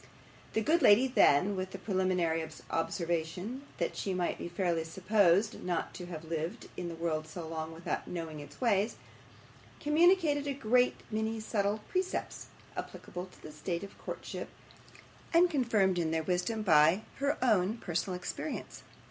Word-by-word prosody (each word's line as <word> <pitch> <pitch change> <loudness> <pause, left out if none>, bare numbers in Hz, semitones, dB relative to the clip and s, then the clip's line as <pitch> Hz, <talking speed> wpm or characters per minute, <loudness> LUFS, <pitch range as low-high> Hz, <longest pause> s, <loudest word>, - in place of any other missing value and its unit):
The 220 - +2
good 330 +8 +3
lady 215 +2 +7
then, 200 - +4
with 185 0 -3
the - - -4
preliminary 185 -4 +1 0.3
observation 170 - -2
that - - -1
she 190 -2 -2
might 180 -1 -1
be - - -4
fairly 170 -2 0
supposed 190 +4 +2
not 175 -2 -2
to 180 - -7
have 165 -3 -6
lived 160 +1 -4
in 175 -1 -4
the 165 - -6
world 160 -2 -2
so 160 +1 -7
long 160 0 -4
without 165 +1 -4
knowing 165 -3 -5
its 145 -1 -11
ways, 215 -3 +2 0.8
communicated 310 -2 +4
a 280 - -1
great 250 -1 +3 0.2
many 220 +1 -1
subtle 210 -1 0
precepts 370 0 -2 0.3
applicable 180 +1 -6
to - - -19
the 155 - -8
state 170 +4 -3
of 200 - -9
courtship, - - -6 0.9
and 350 +1 +6
confirmed 215 - +2
in 165 -2 +1
their 160 0 0
wisdom 180 +6 0
by 165 +2 +5
her 280 +1 +1
own 215 -2 +3
personal 180 -2 -2
experience. 180 - -5
185 Hz, 155 wpm, -32 LUFS, 165-220 Hz, 0.9 s, lady